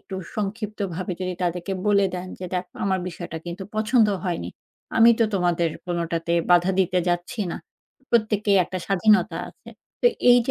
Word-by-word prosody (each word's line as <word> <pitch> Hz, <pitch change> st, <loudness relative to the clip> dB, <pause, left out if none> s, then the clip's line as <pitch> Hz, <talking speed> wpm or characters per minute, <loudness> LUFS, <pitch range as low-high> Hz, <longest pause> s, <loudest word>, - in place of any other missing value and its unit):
একটু 195 Hz, -, -9 dB, 0.2 s
সংক্ষিপ্তভাবে 200 Hz, -3 st, -3 dB
যদি 185 Hz, 0 st, -2 dB
তাদেরকে 175 Hz, +2 st, -2 dB
বলে 200 Hz, -1 st, +4 dB
দেন। 180 Hz, 0 st, -5 dB
যে 185 Hz, -, -4 dB
"দেখো 180 Hz, 0 st, -4 dB
আমার 190 Hz, -1 st, +1 dB
বিষয়টা 160 Hz, -2 st, -6 dB
কিন্তু 175 Hz, +3 st, -5 dB
পছন্দ 220 Hz, +1 st, +4 dB, 0.2 s
হয়নি। 175 Hz, -3 st, -2 dB, 0.5 s
আমি 230 Hz, +1 st, +8 dB
তো -, -, +6 dB
তোমাদের 175 Hz, -3 st, +1 dB, 0.2 s
কোনটাতে 170 Hz, -1 st, -2 dB, 0.2 s
বাধা 175 Hz, +1 st, +5 dB
দিতে 185 Hz, 0 st, +1 dB
যাচ্ছি 175 Hz, +5 st, -2 dB
না। -, -, -4 dB, 0.5 s
প্রত্যেকেরই 215 Hz, -3 st, +3 dB
একটা 185 Hz, -, -5 dB
স্বাধীনতা 205 Hz, +2 st, +3 dB
আছে।" -, -, -19 dB, 0.3 s
তো -, -, +6 dB, 0.2 s
এই 245 Hz, -, +8 dB
যে -, -, +1 dB
185 Hz, 160 wpm, -24 LUFS, 175-210 Hz, 0.5 s, আমি